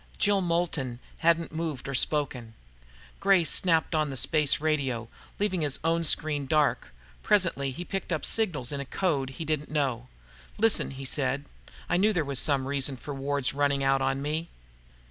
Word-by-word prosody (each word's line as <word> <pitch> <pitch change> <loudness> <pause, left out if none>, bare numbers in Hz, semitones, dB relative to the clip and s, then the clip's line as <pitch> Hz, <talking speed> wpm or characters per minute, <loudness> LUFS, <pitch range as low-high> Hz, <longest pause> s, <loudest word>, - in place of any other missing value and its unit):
Jill 205 -1 +2
Moulton 165 -8 -1 0.2
hadn't 170 0 +2
moved 155 -5 -4
or 140 - -4
spoken. 125 -4 +2 0.6
Gray 195 -3 +4
snapped 165 0 +2
on 155 -2 +1
the 135 - -4
space 150 +2 +2
radio, 135 -7 -1 0.3
leaving 200 -4 0
his 145 -3 -1
own 165 +1 +1
screen 150 -3 +1
dark. 150 0 +1 0.3
Presently 170 -9 +2
he 170 +7 -6
picked 195 -1 -4
up 155 -4 -1
signals 165 - 0
in 140 - -4
a 140 - -5
code 145 -6 -1
he 165 - -5
didn't 150 -1 -2
know. 135 -5 -1 0.5
"Listen," 225 0 +3
he 135 0 -8
said. 135 +1 -1 0.4
"I 175 - +1
knew 210 +4 +3
there 165 -5 0
was 140 -2 +1
some 140 -3 +3
reason 140 -1 0
for 145 +4 -7
Ward's 140 0 -1
running 140 -1 +1
out 135 0 +2
on 135 +1 -1
me." 155 +3 -3
145 Hz, 170 wpm, -27 LUFS, 135-165 Hz, 0.6 s, Gray